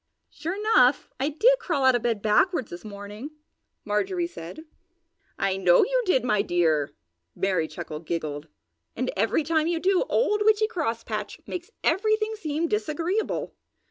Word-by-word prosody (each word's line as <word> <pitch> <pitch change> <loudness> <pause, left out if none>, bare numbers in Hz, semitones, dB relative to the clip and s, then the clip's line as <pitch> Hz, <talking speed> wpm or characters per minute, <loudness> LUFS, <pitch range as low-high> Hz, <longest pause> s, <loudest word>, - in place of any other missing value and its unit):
"Sure 345 +3 -4
enough, 390 - +3
I 275 +3 +1
did 475 +12 +4
crawl 285 -7 0
out 260 - +6
of 245 - +1
bed 225 -4 -1
backwards 260 - +2
this 175 0 -8
morning!" 205 +5 -8 0.6
Marjorie 345 - 0
said. 185 - -8 0.8
"I 195 -1 0
know 180 -2 +5
you - - +1
did, 265 -9 +3
my 210 -4 +2
dear!" 160 -6 +1 0.4
Merry 185 -5 0
Chuckle 155 0 -7
giggled. 155 -2 -4 0.5
"And 255 +1 -1
every 225 +9 +1
time 315 +1 +1
you 340 -1 0
do 370 +1 +2
old 420 -3 +2
Witchy 435 0 +4
Crosspatch 300 - -3
makes 355 +2 -6
everything 435 +2 +1
seem 320 -4 -2
disagreeable!" 365 +1 -1
280 Hz, 145 wpm, -26 LUFS, -, 0.8 s, out